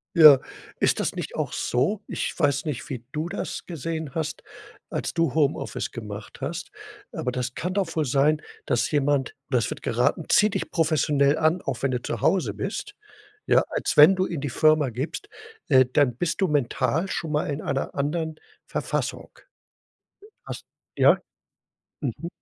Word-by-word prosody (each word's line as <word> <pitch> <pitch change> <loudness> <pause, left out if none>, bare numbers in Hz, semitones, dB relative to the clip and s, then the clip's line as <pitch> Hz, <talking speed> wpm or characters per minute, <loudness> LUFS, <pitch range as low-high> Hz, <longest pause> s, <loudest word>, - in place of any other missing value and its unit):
Ja. 155 -5 +10 0.4
Ist - - +2
das - - -1
nicht - - -5
auch - - -2
so? 145 - 0
Ich - - -3
weiß 145 -1 +1
nicht, 145 -5 -4
wie 125 -5 -5
du 155 +2 -3
das 195 - -5
gesehen 160 -3 -5
hast, 160 -2 -3 0.5
als - - -3
du 165 -1 +1
Homeoffice 150 -2 0
gemacht 105 -3 -8
hast. - - -4 0.4
Aber 125 - -2
das 125 0 -3
kann 180 +2 -3
doch 190 -4 -1
wohl 155 -2 +1
sein, 145 +4 +2 0.2
dass 120 - +1
jemand 145 -2 +1
das 125 -4 +1
wird - - -6
geraten: 125 +7 0
„Zieh 210 - +5
dich - - -3
professionell 150 -3 +2
an. 160 +3 +2
Auch 125 -3 -4
wenn 135 - +2
du 125 -1 -1
zu - - -4
Hause 185 +2 +2
bist. 415 -1 -5 0.5
Ja, - - +5
als - - -1
wenn 150 +6 +9
du 185 0 +1
in 165 -5 -4
die 145 0 -3
Firma 155 0 +3
gibst. 135 - -5 0.4
Äh, 130 -3 +6
dann 135 -3 +3
bist 170 +6 -1
du 190 - +3
mental 145 +4 0
schon 160 -4 -3
mal 150 +2 +1
in 145 +1 -3
einer 135 - -2
anderen 160 +3 -2 0.3
Verfassung.“ - - -3 1.1
Has - - -6 0.3
ja? - - +6 0.9
Mhm. 145 +5 -3
150 Hz, 165 wpm, -25 LUFS, 135-165 Hz, 1.1 s, Ja